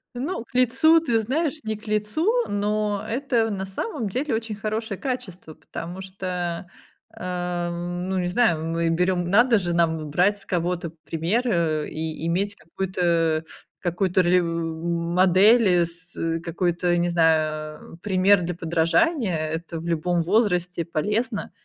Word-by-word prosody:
Ну, 270 Hz, +3 st, -3 dB
к -, -, -27 dB
лицу, 260 Hz, +7 st, +5 dB
ты 235 Hz, -8 st, +1 dB
знаешь, 300 Hz, +6 st, -1 dB
не 220 Hz, 0 st, -2 dB
к 215 Hz, +1 st, -14 dB
лицу, 215 Hz, -, +1 dB, 0.2 s
но 205 Hz, 0 st, -1 dB
это, 235 Hz, -2 st, 0 dB
на 195 Hz, -2 st, -3 dB
самом 225 Hz, -, -4 dB
деле, 260 Hz, +4 st, -1 dB
очень 225 Hz, -1 st, -3 dB
хорошее 215 Hz, 0 st, -3 dB
качество, 185 Hz, -, -5 dB
потому 175 Hz, +3 st, -7 dB
что, 180 Hz, -2 st, -4 dB, 0.5 s
ам, 175 Hz, 0 st, -3 dB
ну 190 Hz, -, 0 dB
не 180 Hz, -, -1 dB
знаю, 180 Hz, -5 st, +2 dB
мы 165 Hz, +1 st, 0 dB
берем 175 Hz, +1 st, +1 dB
надо 235 Hz, +2 st, +5 dB
же 175 Hz, -3 st, -1 dB
нам 160 Hz, -3 st, 0 dB
брать 190 Hz, +6 st, +3 dB
с -, -, -8 dB
кого-то 175 Hz, -1 st, -2 dB
пример, 170 Hz, +8 st, 0 dB
э, 165 Hz, -7 st, 0 dB
и 160 Hz, +1 st, -4 dB
иметь 200 Hz, +4 st, 0 dB
какую-то 165 Hz, -2 st, 0 dB, 0.4 s
какую-то 180 Hz, +1 st, +1 dB
ролев 180 Hz, +1 st, +4 dB
модель, 175 Hz, +5 st, +3 dB
с 175 Hz, +1 st, -4 dB, 0.3 s
какой-то, 175 Hz, 0 st, 0 dB
не 175 Hz, 0 st, +1 dB
знаю, 155 Hz, -2 st, 0 dB
пример 195 Hz, 0 st, +4 dB
для 175 Hz, 0 st, -3 dB
подражания. 175 Hz, -, +1 dB
Это 160 Hz, +1 st, -4 dB
в 165 Hz, -, -8 dB
любом 170 Hz, +1 st, +1 dB
возрасте 180 Hz, -3 st, +1 dB
полезно. 210 Hz, +8 st, -2 dB
180 Hz, 140 wpm, -24 LUFS, 170-210 Hz, 0.5 s, лицу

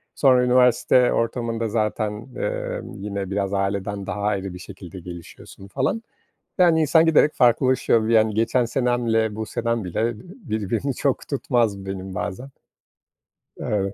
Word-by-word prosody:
Sonra 130 Hz, -3 st, +4 dB
üniversite 125 Hz, 0 st, +4 dB
ortamında 115 Hz, -1 st, -1 dB
zaten, 110 Hz, -1 st, -1 dB, 0.2 s
emm, -, -, -4 dB
yine 100 Hz, -1 st, -5 dB
biraz 100 Hz, 0 st, -1 dB
aileden 100 Hz, 0 st, -2 dB
daha 100 Hz, +2 st, -4 dB
ayrı 100 Hz, -3 st, -1 dB
bir 90 Hz, -, -9 dB
şekilde 95 Hz, -2 st, -10 dB
gelişiyorsun 90 Hz, +2 st, -11 dB
falan. 135 Hz, -, -1 dB, 0.5 s
Yani 170 Hz, -3 st, +5 dB
insan 160 Hz, +2 st, +4 dB
giderek 155 Hz, -2 st, +4 dB
farklılaşıyor, 125 Hz, -2 st, +3 dB
vi 115 Hz, -, +1 dB
yani 110 Hz, -1 st, +4 dB
geçen 115 Hz, +3 st, +1 dB
senemle 115 Hz, -3 st, 0 dB
bu 110 Hz, 0 st, -4 dB
senem 115 Hz, 0 st, -2 dB
bile, 90 Hz, +3 st, -3 dB
ııı, 115 Hz, +1 st, +1 dB, 0.3 s
birbirini 110 Hz, -, -2 dB
çok 140 Hz, -3 st, -1 dB
tutmaz 115 Hz, -8 st, 0 dB
benim 95 Hz, -1 st, -6 dB
bazen. 105 Hz, +8 st, -4 dB, 1.1 s
Evet. 100 Hz, -2 st, -2 dB
110 Hz, 140 wpm, -23 LUFS, 100-125 Hz, 1.1 s, Yani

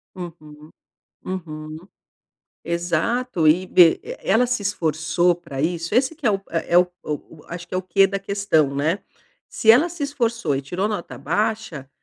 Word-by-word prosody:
Uhum, 155 Hz, -4 st, -10 dB, 0.5 s
uhum. 155 Hz, -4 st, -6 dB, 0.8 s
Exato 175 Hz, +4 st, 0 dB
e 175 Hz, +5 st, +4 dB
e 170 Hz, -3 st, +7 dB
e -, -, -7 dB
ela 225 Hz, +6 st, +3 dB
se 250 Hz, -2 st, -1 dB
esforçou 170 Hz, -2 st, +1 dB
pra 165 Hz, -6 st, -6 dB
isso? 170 Hz, +3 st, -2 dB
Esse 260 Hz, +6 st, +2 dB
que 310 Hz, -4 st, -5 dB
é -, -, +5 dB
o 195 Hz, -1 st, 0 dB
é 170 Hz, +1 st, 0 dB
o 180 Hz, 0 st, +6 dB, 0.2 s
o 150 Hz, +1 st, -6 dB
o, 150 Hz, -, -17 dB
acho 175 Hz, +1 st, -7 dB
que 175 Hz, -, -8 dB
é -, -, +1 dB
o -, -, -3 dB
quê 195 Hz, +2 st, +4 dB
da 195 Hz, 0 st, -3 dB
questão, 195 Hz, -8 st, +1 dB
né. 155 Hz, +7 st, 0 dB, 0.5 s
Se 220 Hz, -, +3 dB
ela 255 Hz, +10 st, +6 dB
se 345 Hz, -3 st, -7 dB
esforçou 235 Hz, -, -1 dB
e 135 Hz, -, -1 dB
tirou 180 Hz, +8 st, -2 dB
nota 210 Hz, -5 st, -4 dB
baixa, 210 Hz, -10 st, -2 dB
175 Hz, 175 wpm, -22 LUFS, 160-210 Hz, 0.8 s, e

